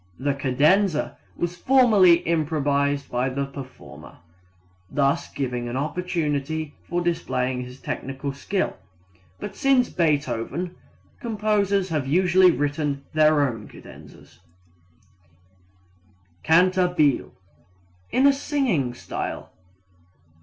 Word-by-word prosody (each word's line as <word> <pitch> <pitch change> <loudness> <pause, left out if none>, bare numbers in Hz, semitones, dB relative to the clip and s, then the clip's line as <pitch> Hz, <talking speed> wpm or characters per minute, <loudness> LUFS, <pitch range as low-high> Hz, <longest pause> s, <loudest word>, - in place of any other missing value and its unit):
The 140 +2 0
cadenza 150 +7 +2 0.2
was 175 0 -2
formerly 205 -6 +5
improvised 145 -3 0
by 125 +2 0
the 140 +2 -2
performer, 135 -2 -11 0.7
(thus 140 -1 0
giving 125 -3 -3
an 120 - -3
opportunity 155 -1 -2 0.2
of 175 +1 -1
displaying 130 -7 -1
his 125 +1 -11
technical 135 +1 -5
skill), 185 +7 -2 0.6
but 200 -1 -7
since 270 -2 +2
Beethoven, 150 +1 -1 0.4
composers 205 -5 0
have 150 -5 -2
usually 180 +4 +5
written 145 -2 -1
their 155 -2 +4
own 115 -4 -6
cadenzas. - - -15 2.0
Cantabile 180 -3 +3 0.8
in 265 - +3
a 280 - +7
singing 255 - -1
style. - - -6
155 Hz, 95 wpm, -24 LUFS, 140-185 Hz, 2.0 s, a